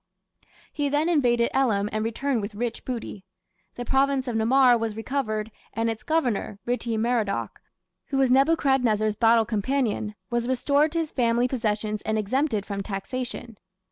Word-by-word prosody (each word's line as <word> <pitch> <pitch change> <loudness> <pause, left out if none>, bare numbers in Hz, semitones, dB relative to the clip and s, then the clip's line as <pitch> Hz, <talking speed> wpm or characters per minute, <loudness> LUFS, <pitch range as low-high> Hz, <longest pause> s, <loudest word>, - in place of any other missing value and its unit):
He 290 -2 -1
then 295 +3 +1
invaded 240 -7 +2
Elam 220 -7 +2
and 215 0 -1
returned 235 +2 -1
with 205 +1 -6
rich 235 +2 -3
booty. 230 -6 -5 0.5
The 245 - -5
province 270 +1 +1
of 240 - -2
Namar 245 +3 +5
was 225 -2 -2
recovered, 225 -3 -2 0.2
and 225 +1 0
its 220 - -7
governor, 250 -10 -1
Ritti 240 -2 -1
Merodach, 225 -3 -1 0.5
who 275 - -2
was 265 -2 +3
Nebuchadrezzar's 265 -7 +3
battle 225 0 +4
companion, 215 -1 -1 0.2
was 240 0 0
restored 280 +4 +2
to - - -1
his 325 -2 -1
family 240 -1 +2
possessions 215 -4 -2
and 220 0 -1
exempted 215 0 0
from 200 -1 -4
taxation. 230 +3 -5
235 Hz, 150 wpm, -25 LUFS, 215-270 Hz, 0.5 s, Namar